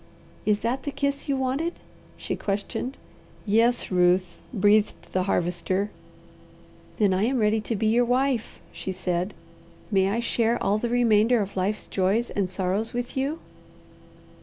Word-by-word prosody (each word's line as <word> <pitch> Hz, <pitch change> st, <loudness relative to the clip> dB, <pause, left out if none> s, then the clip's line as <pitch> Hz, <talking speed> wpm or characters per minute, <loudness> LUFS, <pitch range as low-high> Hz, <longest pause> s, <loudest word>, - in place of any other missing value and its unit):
"Is 210 Hz, -1 st, +2 dB
that 245 Hz, +4 st, -1 dB
the 285 Hz, -, -4 dB
kiss 280 Hz, 0 st, -2 dB
you 275 Hz, -, +2 dB
wanted?" 270 Hz, +6 st, -1 dB, 0.4 s
she -, -, -3 dB
questioned. 205 Hz, +6 st, -3 dB, 0.5 s
"Yes, 230 Hz, +3 st, +2 dB
Ruth," 180 Hz, 0 st, +2 dB
breathed 210 Hz, -1 st, +3 dB, 0.2 s
the 185 Hz, -, +2 dB
Harvester. 185 Hz, +4 st, 0 dB, 1.1 s
"Then 205 Hz, -3 st, +3 dB
I 190 Hz, +3 st, +2 dB
am 260 Hz, +2 st, +1 dB
ready 215 Hz, -1 st, +2 dB
to 225 Hz, +2 st, -3 dB
be 215 Hz, -, -1 dB
your 235 Hz, +3 st, +4 dB
wife," 250 Hz, -1 st, 0 dB
she 190 Hz, -, -5 dB
said. 185 Hz, +1 st, -2 dB, 0.6 s
"May 195 Hz, -1 st, +3 dB
I 220 Hz, +4 st, 0 dB
share 235 Hz, 0 st, +1 dB
all 205 Hz, +2 st, +2 dB
the 240 Hz, -, -2 dB
remainder 235 Hz, -1 st, +4 dB
of 200 Hz, -1 st, -3 dB
life's 195 Hz, +3 st, -1 dB
joys 200 Hz, +5 st, 0 dB
and 195 Hz, -3 st, -1 dB
sorrows 190 Hz, +4 st, -1 dB
with 245 Hz, 0 st, -4 dB
you?" 275 Hz, +4 st, -1 dB
215 Hz, 150 wpm, -25 LUFS, 195-245 Hz, 1.1 s, your